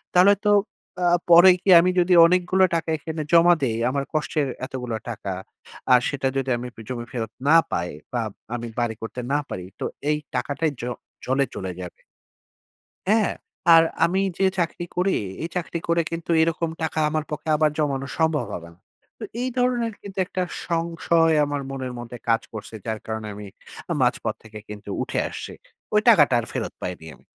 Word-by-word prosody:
তাহলে 185 +3 +7
তো 210 - +5 0.5
আ - - +4 0.2
পরে 175 +2 +9
কি 195 - -1
আমি 180 +2 +3
যদি 180 +1 +3
অনেকগুলো 180 +2 +3
টাকা 165 0 -2
এখানে 160 +1 -5
জমা 170 +1 +7
দেই, 115 -4 0
আমার 140 +1 -1
কষ্টের 155 -1 0 0.2
এতগুলো 125 -3 -4
টাকা। 105 -4 -4 0.6
আর 125 - +8
সেটা 135 -1 -1
যদি 135 -1 -1
আমি 125 +1 -5
পি - - -10
জমি 120 -2 -4
ফেরত 115 -3 -4 0.2
না 160 - +6 0.2
পাই 85 +1 -1 0.2
বা 120 - 0 0.3
আমি 120 0 -5
বাড়ি 120 -2 0
করতে 115 +2 -6
না 145 - +3
পারি। 90 -1 -5
তো - - -2 0.2
এই 150 - +2 0.2
টাকাটাই 145 +5 -1
জ - - -8 0.4
জলে 135 +2 +2
চলে 95 -1 -4
যাবে। 90 - -9 1.1
হ্যাঁ। 220 -1 +3 0.4
আর 165 - +8 0.2
আমি 180 +3 +2 0.2
যে 195 - +3
চাকরি 175 0 -1
করি, 185 +2 +2 0.3
এই 165 - -2
চাকরি 170 -1 -2
করে 170 0 +3
কিন্তু 165 0 -5
এরকম 165 0 0
টাকা 160 0 -2
আমার 155 0 -1
পক্ষে 150 +1 -5
আবার 155 0 +3
জমানো 140 -3 0
সম্ভব 160 -2 +1
হবেনা। 85 0 -9 0.4
তো - - -6 0.2
এই 255 - 0
ধরনের 245 -2 +1
কিন্তু 195 -1 -10
একটা 185 0 -2 0.3
সংশয় 165 -1 +2
আমার 145 0 -2
মনের 130 -2 -4
মধ্যে 120 0 -7
কাজ 115 0 +4
করছে। 110 0 -8
যার 110 -1 -2
কারণে 110 -1 -4
আমি 105 0 -8 0.4
আ - - +2
মাঝপথ - - +1
থেকে 110 -1 -10
কিন্তু 105 -1 -8
উঠে - - -3
আসছি। - - -7 0.4
ওই - - +6
টাকাটা - - +6
আর - - -6
ফেরত - - -3
পাইনি 90 -3 -5
আমি। - - -22
150 Hz, 180 wpm, -24 LUFS, 120-170 Hz, 1.1 s, পরে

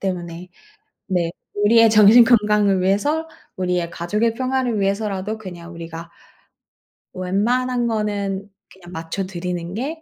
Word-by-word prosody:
때문에 175 -2 -4 0.6
네 175 -3 0 0.3
우리의 230 +2 +6
정신건강을 210 -2 +5
위해서 290 +13 0 0.3
우리의 180 -2 -1
가족의 210 +7 -1
평화를 255 -3 -1
위해서라도 200 +1 -1
그냥 175 -4 -10
우리가 165 0 -8 1.0
웬만한 240 +7 0
거는 205 -2 -2 0.2
그냥 180 -2 -14
맞춰 165 +4 -4
드리는 175 -1 -5
게 295 +8 -4
200 Hz, 280 characters per minute, -21 LUFS, 180-225 Hz, 1.0 s, 우리의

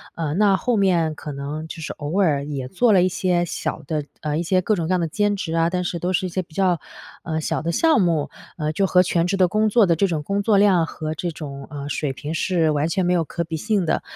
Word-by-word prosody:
呃， 155 -3 -2
那 200 -1 +4
后 245 +3 0
面 175 -5 +2
可 150 - -7
能 145 +3 -5
就 165 - -8
是 160 - -5
偶 155 +6 -3
尔 145 -6 +2
也 140 -3 -4
做 230 - +2
了 185 - +5
一 - - +3
些 180 -1 +1
小 165 - -4
的 155 -2 -1 0.2
呃， 150 -1 -2
一 - - 0
些 185 +2 +2
各 215 +4 +1
种 165 -4 -2
各 - - -2
样 180 - +2
的 170 - 0
兼 205 +5 0
职 185 -5 -4
啊， 165 0 +2
但 180 0 -1
是 175 -1 -3
都 180 +3 -1
是 185 - +1
一 - - -6
些 185 +2 -2
比 165 - -22
较， 185 -3 +2 0.4
呃， 160 -2 -2
小 - - -1
的 170 - -1
项 320 - +3
目， 165 -5 +1 0.3
呃， 155 -2 -1
就 195 +4 +1
和 180 0 +5
全 170 -1 +1
职 195 - 0
的 185 -1 +4
工 215 +4 +1
作 215 -1 +5
的 170 - +2
这 195 +5 +2
种 160 -5 -2
工 200 +6 -1
作 205 0 +3
量 190 -5 +4
和 155 -1 -5
这 175 +3 -3
种， 140 -3 -8
呃， 145 -1 -6
水 140 0 -2
平 150 +4 -6
是 165 -2 +1
完 150 +1 +1
全 185 +1 0
没 180 - +2
有 170 -2 +2
可 170 - -3
比 165 0 -5
性 205 +1 0
的。 - - 0
170 Hz, 295 characters per minute, -22 LUFS, 155-190 Hz, 0.4 s, 了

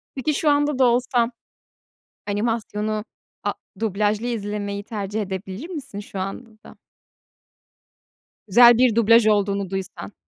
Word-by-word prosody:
Peki 275 +3 -1
şu 300 +1 +1
anda 290 -1 +2
da 255 - +6
olsan 245 0 +2 1.0
animasyonu, 215 0 -2 0.4
a - - +1 0.3
dublajlı 210 +1 0
izlemeyi 205 -3 -3
tercih 210 -1 -3
edebilir 190 - -6
misin 275 - -6
şu 200 -1 -8
anda 195 +5 -5
da? - - -15 1.7
Güzel 240 +3 +7
bir 245 -3 +4
dublaj 230 0 +5
olduğunu 200 -2 +1
duysan. 185 - -6
215 Hz, 115 wpm, -22 LUFS, 200-240 Hz, 1.7 s, Güzel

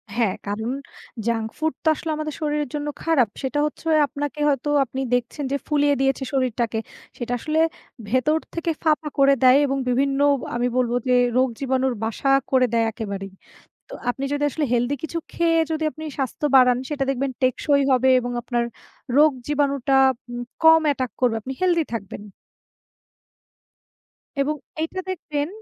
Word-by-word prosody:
হ্যা, 235 -2 +3 0.2
কারণ 220 +4 -2 0.6
junk 225 -1 0
food 315 -1 0
তো - - -2
আসলে 320 - -6
আমাদের 305 -1 -4
শরীরের 295 -2 -1
জন্য 295 0 -3 0.2
খারাপ। 275 -10 +3
সেটা 270 +2 -1
হচ্ছে 300 +2 -6 0.2
আপনাকে 290 +1 -5
হয়তো 280 0 0 0.2
আপনি 265 +2 -5
দেখছেন 245 +4 -1
যে 280 - +1
ফুলিয়ে 290 -1 +2
দিয়েছে 270 0 +1
শরীরটাকে 240 -4 0 0.4
সেটা 240 0 -3
আসলে 310 +5 -1 0.5
ভেতর 260 +6 +2 0.2
থেকে 335 0 -2
ফাঁপা 310 -1 +2
করে 275 0 +6
দেয় 255 +1 +7
এবং 275 0 -1
বিভিন্ন 275 +2 +1 0.4
আমি 240 +1 +1
বলব 245 -2 +1 0.2
যে 250 - +4 0.2
রোগ 260 +1 +4
জীবাণুর 265 -1 0
বাসা 225 +5 -1 0.2
করে 260 -1 +4
দেয় 230 -1 +3
একেবারেই। 200 -3 -6 0.6
তো - - -10 0.2
আপনি 270 +2 -3
যদি 290 0 -1
আসলে 300 +1 -1
হেলথি 245 +4 +1
কিছু 320 +1 -4 0.2
খেয়ে 330 -1 +2
যদি 315 0 -1
আপনি 315 - -10
স্বাস্থ্য 270 +2 -2
বাড়ান, 250 -2 +6
সেটা 290 -2 -1
দেখবেন 275 0 -1
টেকসই 280 +2 +2
হবে 260 0 +4
এবং 245 0 -4
আপনার 240 0 -1 0.5
রোগ 305 +1 +7 0.2
জীবাণুটা 280 -2 +1 0.4
উ - - -5 0.3
কম 320 0 +8
অ্যাটাক 260 -5 0
করবে 245 -3 +3
আপনি 265 +5 -5
হেলথি 345 -3 +2
থাকবেন। 205 -2 -5 2.2
এবং 300 +2 0 0.3
এইটা 325 +4 -3
দেখবেন 300 -5 -3
275 Hz, 155 wpm, -23 LUFS, 245-300 Hz, 2.2 s, কম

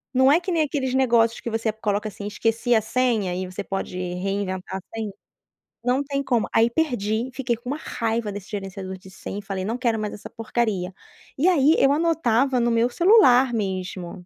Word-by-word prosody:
Não 260 +2 +6
é 325 - +5
que 365 +1 -4
nem 330 -2 +2
aqueles 275 -4 -1
negócios, 235 -3 +3
que 235 - -4
você 225 0 -1
coloca 210 -1 -1
assim, 205 0 -7
esqueci 230 +3 +1
a 220 - +4
senha 220 -6 0
e 185 0 -3
você 185 +2 -6
pode 195 -2 -4
reinventar 185 +1 -3
senha, 220 -2 -4 0.7
não 250 +3 +2
tem 280 0 -2
como 240 -5 +1
aí 225 +1 +5
perdi, 235 -4 -1
fiquei 255 -3 -1
com 240 +2 -8
uma 290 - -2
raiva 225 -6 -2
desse 200 0 -8
gerenciador 195 -2 -5
de 185 +1 -15
senha, 195 +1 -7
e - - -7
falei: 195 -2 -4
"Não 230 +4 -2
quero 235 -3 0
mais 210 -1 -3
essa 205 - -9
porcaria" 215 -5 -2 0.4
e 330 +7 +4
aí 310 -2 +4
eu 275 0 +4
anotava 275 -6 +2
no 235 - +2
meu 230 +1 +2
celular 270 - +5
mesmo, 185 -3 -4
225 Hz, 195 wpm, -24 LUFS, 200-260 Hz, 0.7 s, Não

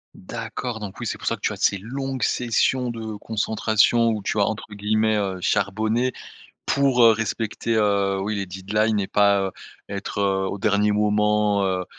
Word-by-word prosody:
D'accord 115 +3 -6
donc 100 -3 -7
oui - - -3
c'est - - -3
pour - - -8
ça - - +2
que - - -20
tu - - 0
as - - -6
ces 100 - +2
longues 130 +5 -4
sessions 125 +1 +1
de 110 -2 -5
concentration 110 +2 +2
où 105 -2 -3
tu 105 - -1
as 100 - +4
entre 110 - -4
guillemets, 110 +1 +1
heu, 95 -2 -2
«charbonné» 110 +6 0 0.5
pour, 135 -3 +2
heu, 115 -1 +8
respecter, 115 +1 -2
heu, 100 -2 +2
oui 105 +2 -2
les 100 -1 -2
deadlines 105 +4 0
et 95 - -2
pas, 100 -1 +3
heu, 95 - -2 0.4
être, 100 0 -5
heu, 95 -1 +1
au - - -4
dernier 105 0 +2
moment, 105 -1 +2
heu, 95 -1 -1
105 Hz, 185 wpm, -23 LUFS, 100-115 Hz, 0.5 s, heu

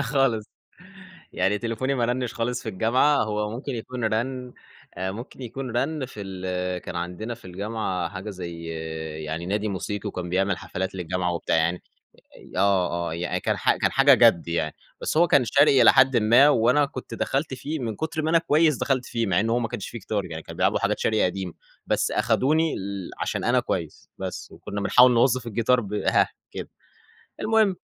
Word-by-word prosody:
خالص، 135 -5 +1 0.9
يعني 95 +3 +1
تليفوني 120 +4 -2
ما 120 -3 +1
رنّش 120 0 -2
خالص 120 +1 -2
في - - -6
الجامعة. 115 +9 +3
هو 105 0 -2
ممكن 130 +5 -5
يكون 120 +1 -5
رن 125 +3 -2 0.4
آآ، 95 +1 -3
ممكن 120 +5 -9
يكون 130 +2 -5
رن 145 0 -1
في 115 -4 -10
ال 90 -1 -3
كان 85 - -6
عندنا 90 +7 -4
في 115 - -20
الجامعة 95 -1 -3
حاجة 100 +2 -7
زي 85 -3 -7 0.6
يعني 80 +3 -4
نادي 105 +3 -1
موسيقي، 105 +2 -4
وكان 90 -3 -5
بيعمل 95 +1 +1
حفلات 95 +1 -4
للجامعة 90 0 -2
وبتاع، 85 - 0
يعني 85 +2 0 0.7
آه 95 -2 +3 0.2
آه، - - -4
يعني 85 +1 -2
كان - - 0
ح - - +2
كان - - 0
حاجة 135 0 +6
جَد 115 -10 +4
يعني، 85 -2 -1 0.3
بس - - -2
هو 170 +2 +6
كان 140 -4 +4
شرقي 140 +2 +5
إلى - - +8
حدٍ 130 -1 +5
ما، 120 +6 +6
وأنا 125 +2 +4
كنت 130 -2 -8
دخلت 135 0 -1
فيه 145 +5 -4
من 115 -5 -4
كتر 160 +3 -3
ما 155 - 0
أنا 165 - +5
كويس، 155 -2 +3
دخلت 130 -2 0
فيه 115 -2 -1
مع 90 -2 +2
إن 115 +2 0
هو 120 - +2
ما 120 -2 -2
كانش 105 - -5
فيه 115 - -7
جيتار 105 -1 -2
يعني، 80 -2 -7
كانوا - - -10
بيلعبوا - - +2
حاجات - - 0
شرقي 110 -1 +2
قديم، 90 -1 -3 0.3
بس - - +1
أخدوني 155 +4 +2
ال 100 -1 -5
عشان - - -2
أنا - - +3
كويس - - -4
بس. - - -5
وكنا 100 - -6
بنحاوِل 125 +5 +6
نوظّف 125 0 +2
الجيتار 115 +3 +2
ب 105 -2 -6
هاه، 105 - +2 0.2
كده، - - -7 0.7
المهم 215 -4 +3
110 Hz, 190 wpm, -25 LUFS, 95-130 Hz, 0.9 s, إلى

